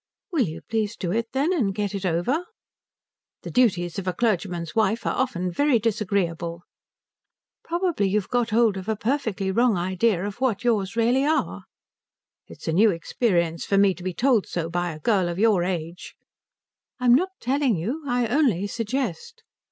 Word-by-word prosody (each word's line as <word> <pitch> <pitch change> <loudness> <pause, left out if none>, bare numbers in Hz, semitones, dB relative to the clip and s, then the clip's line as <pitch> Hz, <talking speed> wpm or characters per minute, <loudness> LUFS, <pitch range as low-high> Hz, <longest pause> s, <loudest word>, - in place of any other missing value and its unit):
"Will 290 - +2
you 160 +1 -7
please 220 -1 -1
do 175 - -3
it, 230 +3 -1
then, 285 +7 +1
and 215 - 0
get 205 -1 -2
it 195 -1 -2
over?" 210 - 0 1.0
"The - - -6
duties 195 -8 +1
of 190 - -7
a 185 - 0
clergyman's 180 -7 -1
wife 220 +1 +1
are - - +1
often 185 -8 -1
very 285 - +3
disagreeable." 185 -6 -1 1.0
"Probably 340 - 0
you've 205 0 0
got 245 -2 0
hold 220 -2 +3
of 190 +3 -6
a 220 - +1
perfectly 215 -5 -1
wrong 235 0 +3
idea 185 +2 0
of 205 +4 -6
what 240 -4 0
yours 210 -5 0
really 240 +4 +2
are." 310 +2 0 0.8
"It - - -14
is - - -8
a 160 - +1
new 215 +6 +5
experience 170 -2 0
for 195 - +1
me 195 -1 +5
to 180 - -13
be 185 +1 -2
told 245 -5 +2
so 165 -1 -3
by 175 0 -1
a 155 - -8
girl 190 0 +1
of 170 - -4
your 205 -4 +3
age." 175 -1 -4 0.8
"I 250 - -3
am 240 - +7
not 355 +9 +3
telling 265 -2 +1
you. 225 - -3
I 245 -1 +1
only 230 - +2
suggest." 255 - -4
210 Hz, 180 wpm, -24 LUFS, 180-245 Hz, 1.0 s, am